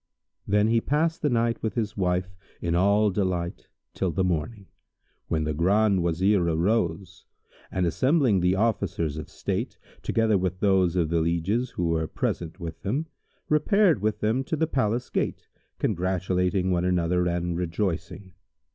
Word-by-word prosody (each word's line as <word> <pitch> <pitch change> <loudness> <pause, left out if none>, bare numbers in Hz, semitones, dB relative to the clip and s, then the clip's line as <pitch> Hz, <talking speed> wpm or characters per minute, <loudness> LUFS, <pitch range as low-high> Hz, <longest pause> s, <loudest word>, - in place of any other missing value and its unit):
Then 105 +1 +3
he 115 0 +3
passed 160 +5 0
the 150 - +2
night 115 -1 0
with 110 -3 -2
his 110 -2 -2
wife 90 -1 -1 0.2
in 85 -1 -1
all 100 +4 +3
delight 90 -3 -2 0.3
till 95 - -1
the 95 +3 0
morning, 90 +4 -2 0.6
when 80 -1 0
the 75 0 -1
Grand 95 +4 +2
Wazir 90 +4 +2
arose 85 +1 -1 0.4
and, 90 -1 0
assembling 120 - +2
the 90 +1 +2
Officers 95 -8 -1
of 80 - -8
state, - - -3 0.2
together 110 -3 +2
with 90 0 -2
those 95 -3 +3
of 85 -3 +1
the 85 0 +1
lieges 85 +9 0
who 85 -1 -2
were 80 -1 0
present 85 +3 -3
with 85 -2 -7
them, 130 +11 -1 0.4
repaired 160 - +3
with 105 0 -1
them 115 +5 +1
to 160 - -1
the 160 - +1
palace 120 -5 -1
gate, - - -2 0.3
congratulating 90 0 0
one 90 -1 +1
another 90 0 +1
and 85 0 -1
rejoicing. 90 +1 -3
95 Hz, 155 wpm, -26 LUFS, 85-110 Hz, 0.6 s, Then